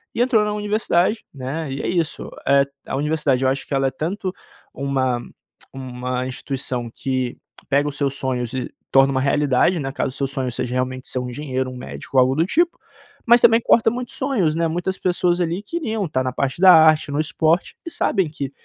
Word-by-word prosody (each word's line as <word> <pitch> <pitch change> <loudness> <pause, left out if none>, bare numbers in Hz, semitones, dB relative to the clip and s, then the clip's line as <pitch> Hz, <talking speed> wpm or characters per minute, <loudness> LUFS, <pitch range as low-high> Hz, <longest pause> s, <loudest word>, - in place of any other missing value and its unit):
e - - +1
entrou 245 -4 +3
na 210 - -1
universidade, 210 -1 0
né, 140 +3 -4
e 135 - -4
é - - -3
isso, 170 -3 -2 0.2
eh 140 0 +5 0.2
a - - -3
universidade 145 -3 +1
eu - - +4
acho 135 0 -3
que - - -5
ela 135 0 +2
é - - -1
tanto, 185 - -3 0.4
uma 130 -3 -1 0.5
uma 125 -1 -4
instituição 130 -2 -4
que, 130 +1 -2 0.2
que - - -18
pega 145 +1 +2
os 145 - -9
seus 140 -2 0
sonhos 125 -3 -2
e 130 -2 -4 0.2
torna 135 0 +5
uma 130 -1 0
realidade, 145 +5 +2
né, 135 -1 -3
caso 135 - -2
o - - -8
seu 140 - 0
sonho 130 -2 -3
seja 120 +1 -3
realmente 130 0 -2
ser 130 - -2
um 125 0 -4
engenheiro, 130 0 -3
um - - -9
médico 125 - -9
ou - - +8
algo 130 +1 +2
do 160 +3 +2
tipo, 340 - +1 0.5
mas 240 +1 +6
também 230 0 +6
corta 230 -1 +4
muitos 245 +1 -5
sonhos, 230 - +1
né. 165 0 +1
Muitas 175 +3 -2
pessoas 180 -1 +1
ali 175 +3 -1
queriam 225 - -3
tá 130 -3 0
na 130 -1 -2
parte 135 +3 -2
da 185 -1 +9
arte, 155 -2 +5
no 145 - -1
esporte 160 +2 +1
e - - -4
sabem 190 - 0
que, 140 -3 -5
145 Hz, 210 wpm, -21 LUFS, 130-180 Hz, 0.5 s, da